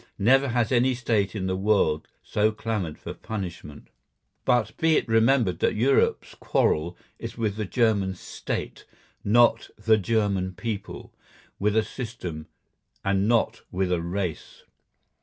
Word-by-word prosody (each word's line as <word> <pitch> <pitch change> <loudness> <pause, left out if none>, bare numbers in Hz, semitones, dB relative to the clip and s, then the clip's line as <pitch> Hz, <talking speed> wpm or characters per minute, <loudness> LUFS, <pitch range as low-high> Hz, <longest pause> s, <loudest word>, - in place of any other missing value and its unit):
Never 135 +7 +4
has 120 -2 0
any 125 +1 +3
State 110 -5 0
in 95 -3 -2
the 95 0 0
world 95 -6 +1 0.2
so 105 +1 +1
clamoured 105 -7 -3
for - - -7
punishment. 90 -9 -7 0.6
But 115 -3 +2
be 160 -1 +3
it - - -1
remembered 115 -5 +3
that - - +1
Europe's 130 +6 +2
quarrel 85 +3 0 0.2
is - - -7
with 110 -4 -1
the 110 0 -3
German 100 -3 +1
State, - - -5 0.4
not 115 +2 +4
with 105 - -21
the 110 -1 +6
German 100 -3 0
people; 105 +2 -6 0.5
with 105 +2 +1
a 110 - +4
system, 105 -10 -6 0.6
and 100 +1 +2
not 115 -1 +1
with 90 0 -1
a 90 -2 +1
race. 85 -1 -4
105 Hz, 140 wpm, -25 LUFS, 95-115 Hz, 0.6 s, the